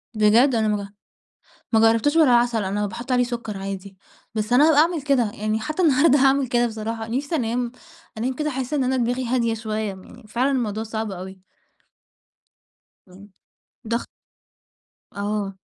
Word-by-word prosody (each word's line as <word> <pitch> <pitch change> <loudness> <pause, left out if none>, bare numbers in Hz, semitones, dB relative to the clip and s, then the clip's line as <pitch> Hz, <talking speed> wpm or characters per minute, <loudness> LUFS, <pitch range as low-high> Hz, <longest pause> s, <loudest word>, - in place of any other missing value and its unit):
بجد؟ 230 +5 +4
أنا 220 -1 +1
ما 205 -1 0
ج - - -8 0.9
ما 220 - +5
جرّبتوش 230 +8 +3
بالعَسَل 240 -7 +4
أنا 205 +2 -1
باحُط 240 +6 -7
عليه 250 0 +3
سُكّر 235 -4 -5
عادي، 195 0 -7 0.4
بس 215 +3 -1
أنا 290 +5 +6
هابقى 295 -2 +5
أعمل 330 -2 +1
كده. 260 -7 +1
يعني 215 +1 -2
حتّى 310 +11 -3
النهارده 290 -2 +4
هاعمل 270 -1 +3
كده 240 0 +2
بصراحة. 225 0 -5
نِفْسي 280 +7 -2
أنام 240 -2 -1 0.5
أنام 255 +4 -1
كده 300 +1 -2
أحِس 265 +1 -4
إن 275 -3 +1
أنا 260 +1 0
دماغي 245 +1 -1
هادية 235 -2 +1
شوية، 220 -1 -4
يعني 195 +5 -10
فعلًا 250 +6 0
الموضوع 220 -4 -1
صعب 220 -1 -4
أوي. 190 0 -9 1.6
امم. 195 +3 -15 0.6
ضَغ 235 +1 -1 1.1
آه. 200 -1 -3
230 Hz, 155 wpm, -23 LUFS, 210-260 Hz, 1.6 s, أنا